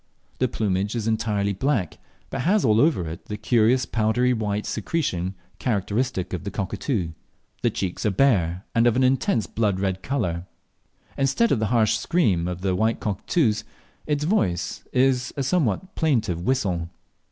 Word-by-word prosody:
The 130 - +3
plumage 100 -1 -1
is 115 -2 -2
entirely 105 -2 0
black, 110 - -1 0.3
but - - -2
has 195 +6 +2
all 110 -1 +4
over 145 - +2
it 80 +1 -7
the 105 - -5
curious 120 +3 +3
powdery 120 +3 +1
white 105 -2 -2
secretion 100 - -2 0.2
characteristic 105 -3 -1
of 90 - -3
cockatoo. 95 - -2 0.5
The - - +3
cheeks 95 -3 -3
are - - +4
bare, 95 -5 +2
and 115 0 +4
of 120 - +3
an 130 - +3
intense 125 -4 +2
blood 105 -3 0
red 95 -1 -1
colour. 95 -10 -2 0.7
Instead 135 - +2
of 120 - +3
the 110 - +1
harsh 110 -2 +3
scream 110 - +1
of 90 0 -4
the 95 -1 0
white 110 +4 +1
cockatoos, 110 - 0 0.4
its 150 -1 0
voice 130 - 0
is 130 0 +2
a 140 - 0
somewhat 165 - 0
plaintive 115 - 0
whistle. 90 -7 0
110 Hz, 155 wpm, -24 LUFS, 95-130 Hz, 0.7 s, all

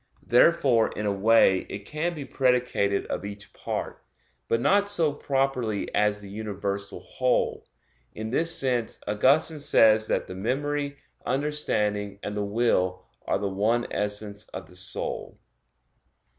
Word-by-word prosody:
Therefore 125 -3 +4
in 105 - -4
a 105 - +1
way 100 -1 +4
it 100 0 -7
can 165 +6 -2
be 145 -3 -6
predicated 125 -7 +1
of - - -4
each 100 +1 -8
part, - - -5 0.4
but 115 - +1
not 200 +10 +3
so 165 -7 +2
properly 135 -7 -1
as 105 0 +2
the 100 - -10
universal 100 -1 -4
whole. 130 -1 -1 0.5
In 110 +1 -5
this 165 +5 +1
sense, 125 -4 -1
Augustine 135 +9 +3
says 110 -7 +4
that - - 0
the - - -8
memory, 140 +7 -2 0.3
understanding, 105 -8 -1
and 105 - -4
the 105 - -1
will 100 -4 +1 0.2
are - - +2
the 100 - -2
one 110 +5 +1
essence 105 0 -3
of 95 - -8
the 90 - -17
soul. 90 +1 -4
110 Hz, 140 wpm, -26 LUFS, 100-135 Hz, 0.5 s, Therefore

